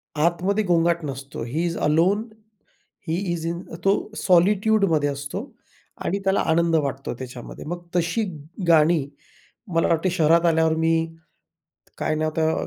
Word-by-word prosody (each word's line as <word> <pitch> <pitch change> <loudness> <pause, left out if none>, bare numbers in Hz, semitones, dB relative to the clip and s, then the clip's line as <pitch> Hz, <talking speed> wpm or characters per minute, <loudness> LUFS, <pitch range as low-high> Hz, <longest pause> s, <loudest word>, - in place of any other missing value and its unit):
आतमध्ये 175 +7 +1
गोंगाट 170 -2 +2
नसतो, 135 -1 -6
ही 145 +9 -2
ईज 170 -1 -2
अलोन, 175 +8 +3 0.8
ही 160 +2 0 0.2
ईज 165 -1 -4
इन 170 +1 -3 0.2
तो 195 - +6 0.3
सॉलिट्यूडमध्ये 190 -3 +3
असतो 140 +8 -5 0.6
आणि 200 - 0
त्याला 195 +1 +2
आनंद 165 0 +2
वाटतो 135 -4 -1
त्याच्यामध्ये. 125 -2 -8
मग 175 +2 -6
तशी 175 +6 +1 0.4
गाणी, 160 -2 +4 0.7
मला 165 - +3
वाटते 165 +3 +1
शहरात 170 -1 +3
आल्यावर 160 -1 +3
मी 160 0 +2 1.0
काय - - -1
नाव 155 0 0
त्या 160 0 +2
165 Hz, 135 wpm, -23 LUFS, 155-175 Hz, 1.0 s, तो